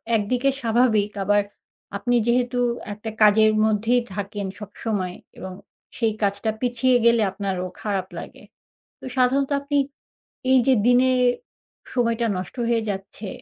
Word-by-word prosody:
একদিকে 245 +5 +1
স্বাভাবিক, 225 -3 +2
আবার 205 +1 +3 0.6
আপনি 245 +4 0
যেহেতু 245 +1 +1 0.4
একটা 210 +2 -7
কাজের 215 +1 +6
মধ্যেই 220 +3 +2
থাকেন 200 0 -4
সবসময় 205 -2 -4 0.2
এবং 190 0 -7 0.5
সেই 225 -3 +1
কাজটা 200 +2 0
পিছিয়ে 250 +1 +2
গেলে 235 -1 +5
আপনারও 190 -2 -3 0.2
খারাপ 195 -3 -2
লাগে। - - -11 0.6
তো - - -11
সাধারণত 265 +2 +2
আপনি 285 +1 -1 0.7
এই 260 - +6
যে 265 - +6
দিনে 250 +1 +5 0.8
সময়টা 235 -1 +1
নষ্ট 185 0 -6
হয়ে 230 -1 +2
যাচ্ছে 195 +1 -6
220 Hz, 125 wpm, -23 LUFS, 205-245 Hz, 0.8 s, কাজের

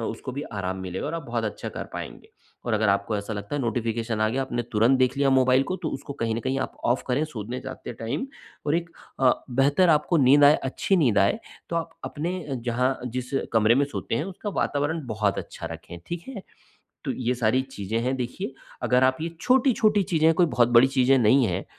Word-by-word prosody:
उसको 115 +3 -5
भी 140 +3 -4
आराम 95 -2 -3
मिलेगा 95 0 -4
और - - -3
आप 165 - -4
बहुत 115 -1 -2
अच्छा 105 - -4
कर - - -6
पाएँगे। - - -8 0.4
और 120 - -2
अगर 110 0 +2
आपको 100 +2 +1
ऐसा 100 +2 -4
लगता 105 +5 -5
है 145 - -1
नोटिफ़िकेशन 115 -1 -2
आ 110 - +3
गया, 130 +4 -1
आपने 120 -2 -2
तुरंत 115 +5 +4
देख 130 +1 +2
लिया 140 -1 +3
मोबाइल 130 0 +4
को 185 - 0
तो 160 - -1
उसको 140 +1 -6
कहीं 115 -1 0
न 115 - -2
कहीं 130 +4 -1
आप 130 - -4
ऑफ 120 +2 +2
करें, 135 +4 +1
सोने 125 -3 -6
जाते 130 -2 -7
टाइम 115 - -4 0.4
और 150 - +2
एक 170 0 -4 0.3
अ, 130 -1 +6 0.2
बेहतर 140 +8 +3
आपको 155 +2 +3
नींद 145 0 +6
आए, 145 +1 +8
अच्छी 135 +8 0
नींद 125 - +3
आए, 100 - +3 0.3
तो 170 - -2
आप 165 0 -2
अपने 175 +3 -4 0.2
जहाँ 125 +2 +1
जिस 125 +1 -4 0.2
कमरे 110 0 +4
में 140 - +3
सोते 140 - -4
हैं, 150 - -1
उसका 195 +2 -6
वातावरण 145 +2 -1
बहुत 105 -3 0
अच्छा - - -7
रखें, 85 +1 -9
ठीक 170 0 -5
है? 230 -8 -7 0.6
तो - - 0
ये 125 -1 -1
सारी 120 +2 +2
चीज़ें 110 -5 -4
हैं, 130 +2 0
देखिए 130 +6 -4 0.3
अगर 125 +1 +3
आप 130 0 +3
ये 165 - -2
छोटी-छोटी 240 -5 +3
चीज़ें 160 -3 +1
हैं, 165 - +6
कोई 180 - +4
बहुत 120 -7 +2
बड़ी 130 +3 +7
चीज़ें 135 0 +3
नहीं 125 +2 +4
है 90 0 -2
130 Hz, 220 wpm, -25 LUFS, 115-145 Hz, 0.6 s, आए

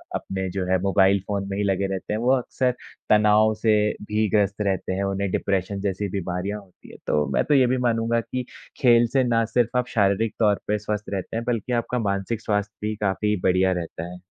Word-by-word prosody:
अपने 95 -1 -3
जो 95 0 -3
है 95 - +4
मोबाइल 95 0 +3
फ़ोन 100 -1 -2
में 100 - -3
ही 105 - 0
लगे 100 0 0
रहते 95 +2 -4
हैं, 110 - -1
वो 125 +2 +2
अक्सर 125 +1 0 0.4
तनाव 105 +1 +5
से 110 -1 +4 0.3
भी 110 0 +1
ग्रस्त 105 0 +1
रहते 95 -2 -1
हैं, 100 +1 -1
उन्हें 100 0 -1
डिप्रेशन 100 0 -1
जैसी 100 0 -2
बीमारियाँ 95 +2 -3
होती 95 -2 -19
है। - - -12
तो 75 0 +2
मैं - - +2
तो 150 - +2
ये 130 -2 +5
भी 130 +1 +1
मानूँगा 115 0 +1
कि 125 +2 -5 0.4
खेल 120 -2 +5
से 135 -1 +4
ना 115 -2 +2
सिर्फ़ 120 +2 0
आप 125 0 0
शारीरिक 100 +1 +1
तौर 105 -2 +3
पे 105 +1 +1
स्वस्थ 105 0 -4
रहते 95 +3 -4
हैं 115 - -2
बल्कि 120 0 -2
आपका 120 +1 -1
मानसिक 100 +2 -2
स्वास्थ्य 105 -1 -2
भी 110 - -2
काफ़ी 105 +1 0
बढ़िया 95 0 +3
रहता 85 +1 -7
है। 90 - -10
105 Hz, 215 wpm, -24 LUFS, 95-115 Hz, 0.4 s, तनाव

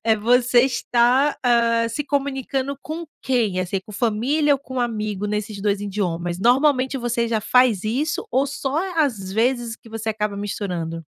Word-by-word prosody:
eh, 220 -1 +3
você 245 +3 +4
está, 255 +2 +2
ah, 235 -1 +3
se 295 +6 -3
comunicando 275 -1 -2
com 320 +4 -6 0.2
quem, 230 -8 0
assim, 185 +1 -2
com - - -13
família 255 +8 +1
ou - - -3
com 260 -2 -6
amigo, 215 -4 -2
nesses 210 0 -3
2 200 0 0
idiomas? 175 -4 -2
Normalmente 260 +4 +3
você 240 -2 -1
já 225 -1 0
faz 245 -3 +3
isso 270 - -1
ou 270 +2 +2
só 275 +1 -2 0.2
às 225 -12 0
vezes 235 +1 0
que 230 - -17
você 225 0 -5
acaba 210 -1 -2
misturando? 175 -5 -4
235 Hz, 160 wpm, -22 LUFS, 210-265 Hz, 0.2 s, você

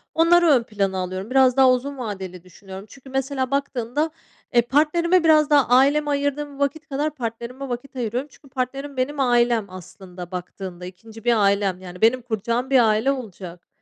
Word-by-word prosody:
onları 340 +1 +5
ön 270 -6 +4
plana 200 -4 -2
alıyorum, 185 +3 -4
biraz 260 -1 +4
daha 265 -1 +6
uzun 270 +3 -2
vadeli 190 -7 -6
düşünüyorum. 190 +2 -11
Çünkü 270 -1 -15
mesela 270 0 -2
baktığımda, 280 +2 -1 0.4
eee, 240 - +6
partnerime 325 +7 +2
biraz 310 -2 +4
daha 290 -3 +4
aileme 285 +4 +4
ayırdığım 285 0 -2
vakit 315 +3 -2
kadar 295 +2 -2
partnerime 245 +2 -6
vakit 245 +2 -6
ayırıyorum 250 +4 -3
Çünkü 275 - -20
partnerim 275 +2 -4
benim 280 +3 -2
ailem 240 -4 +2
aslında 185 0 -11
baktığında 180 0 -7
2. 220 +5 -12
bir 235 -3 +3
ailem, 200 -2 +1
yani, 180 +1 -10
benim 240 +3 +4
kuracağım 235 +2 -2
bir 265 -2 +5
aile 220 +5 +2
olacak. 185 -9 -8
250 Hz, 165 wpm, -22 LUFS, 200-280 Hz, 0.4 s, daha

